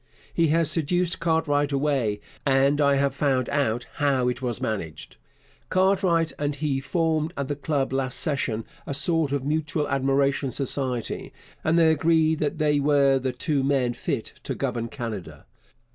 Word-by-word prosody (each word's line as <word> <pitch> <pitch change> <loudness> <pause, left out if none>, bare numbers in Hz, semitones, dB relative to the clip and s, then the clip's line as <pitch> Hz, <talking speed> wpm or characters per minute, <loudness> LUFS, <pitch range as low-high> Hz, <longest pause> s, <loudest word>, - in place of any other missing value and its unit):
He 165 -1 +3
has 160 0 +2
seduced 175 +2 0
Cartwright 150 -3 +1
away, 135 -7 0 0.2
and 140 +2 +3
I 140 -1 +4
have 140 -1 +1
found 135 -3 +1
out 125 -4 0
how 135 -4 +2
it 125 +1 -4
was 120 -3 -2
managed. 90 -8 -5 0.5
Cartwright 185 -4 +2
and 145 0 -1
he 145 -2 -1
formed 160 +3 -1
at 140 -1 -2
the 145 - -1
Club 140 -2 -1
last 130 -2 -1
session 130 -8 -1 0.2
a 140 - -1
sort 160 0 +2
of 140 -2 -1
mutual 150 0 -1
admiration 135 0 +1
society, 130 -2 -3 0.3
and 160 +2 +2
they 165 -1 +5
agreed 160 0 +2
that 150 +1 -1
they 150 -2 +2
were 140 -2 +3
the 130 0 -1
two 140 +2 0
men 135 -3 +1
fit 120 - -3
to - - -4
govern 115 -1 -2
Canada. 115 -8 -7
140 Hz, 160 wpm, -25 LUFS, 135-155 Hz, 0.5 s, they